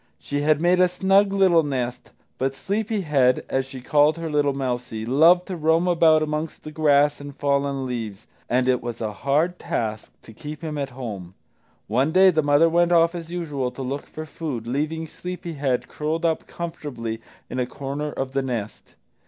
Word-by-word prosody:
She 145 - -3
had 150 0 +3
made 175 +2 +3
a 180 - +6
snug 195 +2 +3
little 190 -4 +4
nest, 125 -4 -3 0.3
but 135 +1 -1
Sleepy 210 - -2
head, 135 -6 +2
as 135 0 -1
she 135 -1 -9
called 150 +4 +3
her 165 -1 -4
little 145 -1 +2
mousie, 125 -4 -3
loved 165 +8 +5
to 190 - -5
roam 165 +2 +2
about 165 -3 +4
among 155 +1 -2
the 155 - -7
grass 145 -1 +3
and 145 -1 -9
fallen 140 -1 0
leaves, 110 -5 -5 0.2
and 125 +1 +2
it 125 -1 +2
was 120 -1 -5
a 110 -2 -3
hard 155 - 0
task 110 -1 -3
to 110 - -13
keep 150 +6 -8
him 155 -2 -4
at 140 - -2
home. 105 -8 -7 0.5
One 130 +8 +1
day 185 +2 +6
the 160 -2 +2
mother 145 +2 +4
went 175 +1 +2
off 170 0 +4
as 170 -1 -7
usual 150 -7 -2
to 135 - -7
look 135 +3 -4
for 155 - -7
food, 150 -8 -5
leaving 155 +6 -2
Sleepy 180 +1 -7
head 130 -4 -1
curled 160 +3 -2
up 160 -1 0
comfortably 140 -10 -5 0.3
in 130 - -4
a 125 - 0
corner 140 +3 -4
of 135 -2 -4
the 135 0 0
nest. 120 -5 -5
145 Hz, 190 wpm, -23 LUFS, 130-165 Hz, 0.5 s, a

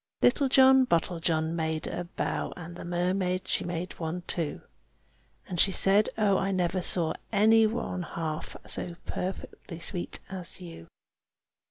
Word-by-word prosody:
Little 270 +2 +4
John 265 -1 +6
Bottlejohn 165 -2 0
made 160 -1 -2
a 175 - -4
bow, 170 - -3
And 175 0 -8
the - - -8
mermaid, 180 +1 -1
she - - 0
made 175 +1 -5
one 170 +2 -3
too, 165 -4 -3 0.8
And 175 - -4
she 195 - +5
said, 195 +3 +5
"Oh! 200 -3 +3
I 195 0 0
never 185 0 0
saw 170 -2 +2 0.2
any 220 +1 +5
one 220 -5 -3
half 160 -3 -5
So 175 - -2
perfectly 180 -2 -6
sweet 175 +1 -3
as 185 -1 -7
you! 165 - -10
180 Hz, 145 wpm, -28 LUFS, 170-195 Hz, 0.8 s, John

